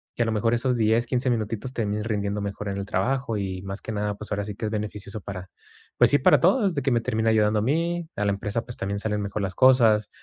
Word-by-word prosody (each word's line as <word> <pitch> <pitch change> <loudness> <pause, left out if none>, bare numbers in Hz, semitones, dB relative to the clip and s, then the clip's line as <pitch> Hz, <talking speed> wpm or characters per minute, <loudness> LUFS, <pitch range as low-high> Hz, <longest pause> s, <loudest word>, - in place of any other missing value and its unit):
y - - -3
a - - -1
lo 115 - -1
mejor 115 +2 +1
esos 125 +1 +1
10, 115 +1 +2
15 125 +1 0
minutitos 115 +2 -2
terminen 105 -3 -2
rindiendo 105 -2 -2
mejor 100 +1 -5
en 100 - -3
el 100 - -3
trabajo 125 +1 -1
y 95 -2 -3
más 95 +1 -6
que - - -6
nada, 105 0 -2
pues, 105 +1 -10
ahora 105 0 -1
sí 105 -1 -6
que, 110 - -4
es 105 - -2
beneficioso 105 -1 -5
para, 95 -2 -7 0.5
pues, - - +6
sí 145 - +5
para - - +5
todos, 195 0 +3
de 140 - 0
que 135 0 0
me 120 -1 +2
termine 110 0 0
ayudando 105 -1 +3
a - - -1
mí, 165 +5 -1
a 105 - 0
la 100 - +2
empresa, 105 +3 -3
pues, 120 - -9
también 100 +1 -3
salen 105 0 -1
mejor 100 +1 -3
las 95 -1 -2
cosas 115 -5 +5
110 Hz, 265 wpm, -25 LUFS, 100-120 Hz, 0.5 s, pues